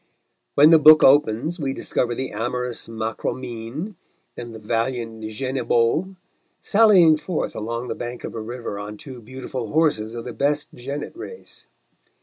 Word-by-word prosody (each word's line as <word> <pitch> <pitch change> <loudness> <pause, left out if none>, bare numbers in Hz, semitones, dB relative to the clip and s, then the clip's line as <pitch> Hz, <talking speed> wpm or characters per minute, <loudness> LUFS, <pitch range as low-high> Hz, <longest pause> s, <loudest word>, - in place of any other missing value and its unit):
When 150 +3 +7
the 165 - +8
book 155 0 +8
opens 145 +4 +3
we 135 -3 -2
discover 120 -2 -1
the 130 +2 -4
amorous 120 +3 -3
Marcomine 115 - -5 0.4
and 120 -1 -8
the - - -8
valiant 115 +1 -2
Genebaud 130 - 0 0.4
sallying 195 -7 +5
forth 155 +2 -3
along 115 +3 -4
the - - -2
bank 120 0 -6
of - - -6
a 115 - -5
river 115 -2 -6
on 105 +1 -7
two 130 +1 -10
beautiful 130 0 -6
horses 145 -9 +1
of 115 - -6
the 125 - -6
best 145 +3 -1
jennet 140 - -6
race. 465 +6 -10
125 Hz, 145 wpm, -22 LUFS, 115-150 Hz, 0.4 s, the